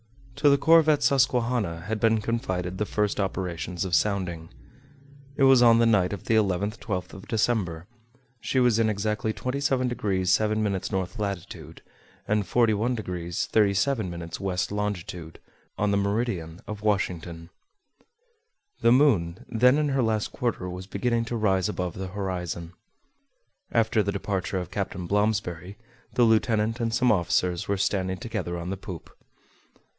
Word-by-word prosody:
To 145 - +4
the 140 - +5
corvette 160 0 +5
Susquehanna 125 -10 +1
had 105 +5 -3
been 110 0 +3
confided 95 -5 -2
the 105 - -1
first 105 -1 -1
operations 90 -2 -3
of 90 - -5
sounding. 85 -3 0 0.9
It 135 - +1
was 135 -2 +7
on 115 -1 +7
the 115 - +4
night 105 -6 +3
of 100 -4 -5
the - - 0
11th 105 +1 +1
12th 90 -5 -4
of 95 - -11
December, 105 -8 0 0.5
she 130 - 0
was 120 -3 +3
in 110 -1 +3
exactly 105 +1 -1
27° 130 +1 -1
7′ 105 -2 0
north 95 +4 -3
latitude, 90 -5 -6 0.4
and 105 0 +1
41° 115 +3 +1 0.5
37′ 100 -5 0
west 95 -1 -2
longitude, 90 -5 -4 0.4
on 105 0 +1
the 100 - +2
meridian 100 -5 -2
of 105 -1 -7
Washington. 90 -5 -2 1.3
The 115 - +4
moon, 105 - +3
then 125 +4 +4
in 150 -1 +1
her 135 -1 +1
last 110 -3 0
quarter, 115 -7 -2
was 90 +1 -7
beginning 115 +3 -1
to 120 - -4
rise 100 -3 +1
above 90 -4 -3
the 95 0 -5
horizon. 90 -3 -4 1.0
After 115 -1 +2
the 100 0 -1
departure 100 -1 -2
of 90 -3 -5
Captain 90 - -3
Blomsberry, 100 -2 -1 0.4
the 125 - +4
lieutenant 110 0 +2
and 115 -1 -1
some 125 +1 +3
officers 90 -2 +1
were 100 - 0
standing 95 -1 0
together 95 -5 -4
on 85 +2 -5
the 100 - -3
poop. 95 -4 -9
105 Hz, 145 wpm, -26 LUFS, 90-115 Hz, 1.3 s, was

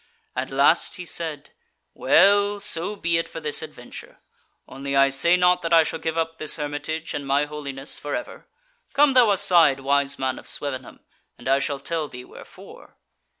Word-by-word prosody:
At 130 +1 -3
last 140 +5 +2
he 180 - -8
said: 160 -4 -5 0.4
"Well, 205 +1 +3
so 200 0 -1
be 170 -4 0
it 165 - -4
for - - -8
this 150 0 0
adventure. 150 -6 -11 0.5
Only 140 +1 -5
I 135 0 +5
say 155 +6 +3
not 180 0 +3
that 170 0 -2
I 165 -1 +7
shall 160 - -4
give 160 0 -3
up 165 0 -2
this 155 - +1
hermitage 150 +2 -5
and 140 - -5
my 140 +2 +2
holiness 140 -2 -5
for 145 - -4
ever. 310 - -8 0.5
Come 290 -1 +4
thou 250 -4 +5
aside, 170 -8 +4
wise 140 +1 +1
man 130 -1 -2
of - - -14
Swevenham, 140 -3 -5 0.4
and - - -10
I 135 +1 +3
shall 140 +1 -2
tell 155 +2 -4
thee 125 -2 -10
wherefore." - - -15
155 Hz, 180 wpm, -23 LUFS, 140-170 Hz, 0.5 s, I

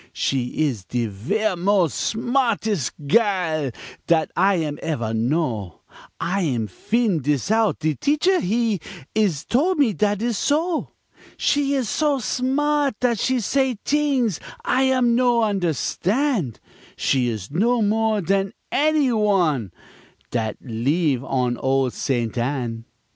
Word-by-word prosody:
She 125 -2 -1
is 115 -9 -4
de 120 -1 -1
ver' 180 - -1
mos' 180 -2 +2
smartes' 225 - 0 0.2
gairl 170 - +1 0.4
Dat 160 -2 +2
I 195 +2 +3
am 150 -4 -2
evere 120 -9 -2
know, 115 - -1 0.4
I'm 165 - 0
fin' 205 - 0
dis 145 - 0
out, 220 -1 +2
de 155 -1 0
teacher, 305 - +2
he 220 +1 0 0.3
Is 190 -9 +1
tol' 325 +10 +2
me 275 -9 +2
dat 205 +4 0
is 235 -3 -1
so; 315 +4 0 0.5
She 280 -1 +1
is 260 -4 0
so 295 +2 +1
smart 275 +2 0
dat 240 -4 +1
she 260 -1 +1
say 260 +2 0
t'ings 275 - +1 0.3
I 260 +1 +2
am 250 -2 +3
no 240 -1 +3
understan', 195 - 0 0.4
She 130 -2 +1
is 110 -3 -4
know 225 +8 +2
more 215 0 +1
dan 195 +3 0 0.2
any 300 -2 +2
one 180 - +1 0.6
Dat 110 -3 -2
leeve 135 +3 0
on 125 -2 -1
ol' 135 0 +1
Ste. 120 -4 -2
Anne. 120 -3 -2
195 Hz, 130 wpm, -22 LUFS, -, 0.6 s, I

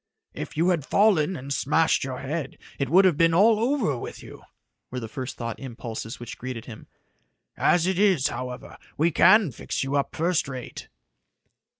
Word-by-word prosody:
"If - - -7
you 170 +3 +3
had 170 -5 +1
fallen 190 -1 +3
and 140 -2 -8
had - - +2
smashed 160 +4 +2
your 130 -1 -5
head, 150 +3 -4 0.2
it 140 - -1
would 190 +4 +6
have 175 -6 +3
been 165 0 +4
all 215 +4 +5
over 235 - +1
with - - -8
you," - - -12 0.5
were 125 - -4
the 115 - -6
first 130 +3 -6
thought 115 -2 -5
impulses 115 -2 -7
which 120 -1 -9
greeted 125 -2 -6
him. 110 -4 -11 0.7
"As 175 -1 +2
it 190 0 0
is, 190 -9 +3
however, 125 -1 -7 0.2
we 165 +3 +2
can 185 +2 +5
fix 115 - -4
you 135 +1 -2
up 140 - -1
first 165 -2 0
rate." 130 -3 -8
150 Hz, 185 wpm, -25 LUFS, 130-180 Hz, 0.7 s, would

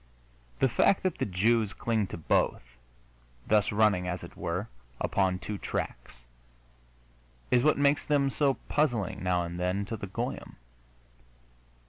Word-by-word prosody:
The 135 - +3
fact 160 - +3
that 185 - -1
the - - 0
Jews 105 +3 +2
cling 110 -4 0
to - - -7
both, 80 - +1 0.8
thus 105 -1 +3
running, 105 -4 +3
as 90 0 -3
it - - -10
were, 90 +6 -3 0.3
upon 95 -2 +1
two 100 +2 -6
tracks, - - -5 1.3
is 125 - +5
what 155 +4 +3
makes 145 +1 +2
them 140 -2 +2
so 140 -2 +2
puzzling, 120 - 0
now 90 -1 +1
and 85 +1 -6
then, 90 +3 0
to 115 - -4
the 100 - -6
goyim. 95 - -5
105 Hz, 140 wpm, -29 LUFS, 90-125 Hz, 1.3 s, is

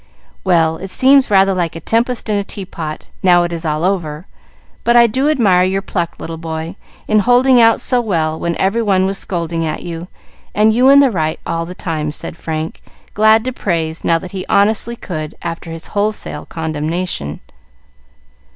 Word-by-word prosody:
"Well, 165 -3 +2
it 190 +3 -7
seems 265 +6 +4
rather 195 -1 +4
like 175 -3 -2
a - - -5
tempest 235 +6 -1
in 210 - 0
a 200 - 0
teapot, 170 -6 -7
now 175 -2 +5
it 175 0 -3
is 165 0 -5
all 155 +1 -1
over, 170 -4 -2 0.6
but 235 - +3
I 240 0 +8
do 260 +6 +1
admire 205 -12 +3
your 190 +1 0
pluck, 175 -4 -3
little 165 0 -7
boy, 160 +2 -5 0.3
in 215 - +3
holding 245 +3 +4
out 225 0 +4
so 250 -2 +2
well 160 -8 -1
when 170 -1 -2
every 195 +5 +1
one 195 -4 +2
was 195 0 -1
scolding 170 -2 -2
at 155 - -3
you, 170 0 -6 0.5
and 215 +1 +4
you 250 +4 +4
in 280 +1 +8
the 270 -3 +3
right 160 -5 -1
all 165 0 -2
the 180 - -8
time," 155 -4 -3
said 150 - -7
Frank, 160 -1 -5 0.3
glad 220 +1 +4
to 255 +1 -3
praise, 165 -7 -2
now 165 - +3
that 175 +2 -8
he 190 -2 -5
honestly 220 +3 +2
could, 155 -8 -6
after 165 0 -5
his 165 0 -7
wholesale 210 +1 -2
condemnation. 160 - -3
185 Hz, 185 wpm, -16 LUFS, 165-215 Hz, 0.6 s, I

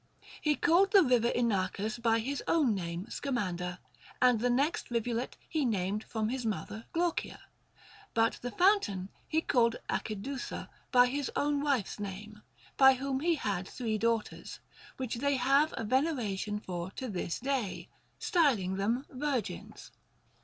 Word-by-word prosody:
He 300 -1 +2
called 360 +6 +3
the 395 -2 +8
river 245 -4 +3
Inachus 215 -2 0
by 230 -1 +3
his 270 +5 -2
own 295 -9 +3
name 175 0 -4
Sca 280 - -4
mander, 180 -6 -2 0.4
and 250 -3 +5
the 245 +2 +1
next 280 +7 +1
rivulet 235 +1 -2
he 315 -2 0
named 205 -3 -1
from 220 -1 -2
his 255 +1 -2
mother 220 0 -4
Glaucia; 340 0 -1 0.8
but 225 0 +2
the 245 - -3
fountain 245 - +2 0.2
he 320 0 +1
called 235 -6 +2 0.2
Acidusa 240 +5 -4 0.2
by 245 -1 +7
his 275 +2 -2
own 290 0 +1
wife's 270 -9 0
name, 205 +1 -7 0.4
by 265 -1 +8
whom 265 0 -2
he 335 +3 +2
had 195 - -2
three 220 -4 -2
daughters, 230 -1 -1 0.4
which 255 -3 -3
they 280 +3 +1
have 275 +5 +3
a - - -2
veneration 220 -6 0
for 180 -3 -5
to 260 - -4
this 180 -5 -3
day, 255 -6 -2 0.3
styling 230 - +2
them 230 +7 0
virgins. 265 -3 -4
240 Hz, 145 wpm, -31 LUFS, 210-275 Hz, 0.8 s, the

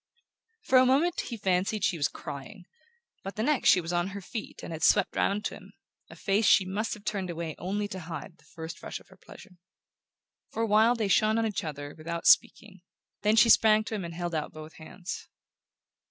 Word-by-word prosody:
For 260 -11 +5
a 255 - +5
moment 325 +7 +2
he 235 - -5
fancied 195 +1 0
she 185 - +2
was 145 - +1
crying; 175 +7 -9 0.6
but 195 - -6
the 215 - -2
next 295 +1 +2
she - - +6
was 170 0 -4
on 175 +1 +1
her 200 +1 -6
feet 210 +3 -8
and 165 - -6
had 160 - -7
swept - - +3
round 205 +1 0
on - - -8
him - - -16 0.4
a - - -12
face 200 +2 +1
she 190 - +5
must 205 +4 -2
have 210 - -16
turned 195 -3 -2
away 165 -2 -4
only 205 +4 -2
to 190 - -6
hide 170 +1 -8
the - - -24
first 160 0 -9
rush - - -6
of - - -22
her - - -17
pleasure. 180 -4 -15 0.9
For 225 - -2
a - - 0
while 220 +3 +4
they 220 -3 -1
shone 215 +3 +3
on 225 - +1
each 215 -3 -2
other 145 -2 -6
without 165 +1 -6
speaking; 195 -4 +3 0.4
then 210 +1 +3
she 230 +1 +6
sprang 215 -1 +6
to 220 - -7
him 205 -3 -3
and 170 -1 -7
held 175 0 -4
out 155 -2 -2
both 155 0 -11
hands. 180 +5 -8
195 Hz, 215 wpm, -28 LUFS, 170-215 Hz, 0.9 s, she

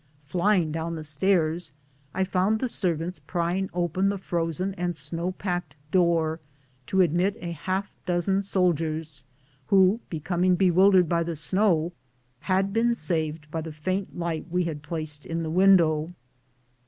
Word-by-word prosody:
Flying 175 +1 +1
down 165 +1 -3
the 160 - -6
stairs 160 +1 +1 0.4
I 190 - 0
found 190 +3 +1
the 255 - 0
servants 175 -5 -2
prying 180 +2 -2
open 175 +2 0
the 200 - -1
frozen 175 -1 -2
and 195 - -8
22 - - -7
BOOTS 180 - +1
AND 175 - -2
SADDLES. 140 -1 -4 0.2
snow - - 0
packed 175 -6 -4 0.2
door, 170 -3 +2 0.5
to 190 - +3
admit 180 +5 +2
a 170 -4 -5
half 185 +5 -3 0.2
dozen 185 +2 +1
soldiers 160 -6 -1 0.4
who, 195 +2 +4
becoming 180 +3 +1
bewildered 185 0 +5
by 170 +1 +1
the 170 0 -2
snow, 175 0 +2 0.5
had 195 +4 0
been 235 +1 +2
saved 155 -6 -2
by 160 - -2
the 160 0 -6
faint 185 +6 -3
light 170 -2 -3
we 180 +1 +1
had 160 -3 -4
placed 150 -1 -5
in 165 0 -3
the 160 - -3
window. 170 -4 +4
175 Hz, 160 wpm, -26 LUFS, 160-190 Hz, 0.5 s, bewildered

